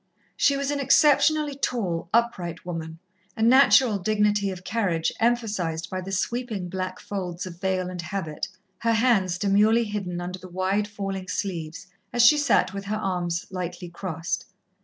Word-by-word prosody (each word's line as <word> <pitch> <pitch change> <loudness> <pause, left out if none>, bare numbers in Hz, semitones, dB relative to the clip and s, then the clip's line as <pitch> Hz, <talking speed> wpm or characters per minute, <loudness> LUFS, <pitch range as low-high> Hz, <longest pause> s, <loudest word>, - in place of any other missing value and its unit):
She 280 -1 +3
was 280 0 -1
an 290 - -1
exceptionally 295 +1 +4
tall, 195 -12 -2
upright 185 -9 0
woman, 165 -2 -5 0.4
a 220 - 0
natural 255 -2 +6
dignity 210 0 +1
of 185 -1 -7
carriage 185 -7 0
emphasized 205 -8 0
by 185 0 -3
the 190 +1 -7
sweeping 215 -1 -2
black 185 0 -4
folds 180 -3 -5
of 175 -1 -10
veil 190 -1 0
and 180 -1 -5
habit, 170 -3 -4 0.3
her 230 0 +1
hands 220 -6 +2
demurely 210 +4 +3
hidden 200 -5 -4
under 180 +1 -5
the 185 0 -11
wide 190 +3 0
falling 195 -2 -5
sleeves 170 -4 -4 0.3
as 240 -1 +4
she 300 +5 +7
sat 285 -8 +2
with 200 0 -6
arms 180 -5 -2
lightly 180 -1 -5
crossed. 170 -1 -4
195 Hz, 155 wpm, -25 LUFS, 180-225 Hz, 0.4 s, she